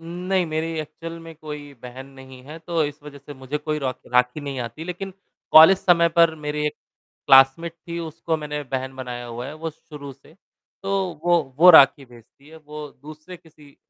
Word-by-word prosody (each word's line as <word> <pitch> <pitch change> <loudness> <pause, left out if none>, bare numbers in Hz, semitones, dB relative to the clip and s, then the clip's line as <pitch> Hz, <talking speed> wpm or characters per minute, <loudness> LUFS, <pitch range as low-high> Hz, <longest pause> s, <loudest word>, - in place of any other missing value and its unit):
उम, 165 - -13 0.2
नहीं, 190 -2 +2
मेरी 155 0 -2
एक्चुअल 165 +2 -9
में 165 0 -12
कोई 150 -2 -9
बहन 125 +2 -10
नहीं 130 -1 -14
है, 155 +4 -10
तो 165 0 -2
इस 145 0 -7
वजह 145 -1 -11
से 145 +1 -12
मुझे 130 +2 -5
कोई 150 0 -3
रॉखी 130 -3 -5
राखी 125 +3 +2
नहीं 140 -2 -6
आती, 120 +6 -7
लेकिन 180 +2 -6 0.4
कॉलेज 160 +4 +9
समय 170 -3 +3
पर 165 -1 +5
मेरे 150 0 -3
एक 150 - -1 0.6
क्लासमेट 135 +5 +5
थी 170 0 -5
उसको 160 0 -4
मैंने 150 -1 -5
बहन 130 0 -5
बनाया 125 -2 -7
हुआ 120 +1 -7
है 145 - -8
वो 160 +1 -6
शुरू 150 -2 -12
से। 155 - -22 0.5
तो 195 - -3 0.3
वो 175 -1 +4 0.2
वो 175 +3 +8
राखी 140 -3 +6
भेजती 120 +3 -20
है, 160 - -14
वो 150 -1 -9
दूसरे 155 +4 -12
किसी 155 -4 -20
150 Hz, 195 wpm, -22 LUFS, 135-165 Hz, 0.6 s, कॉलेज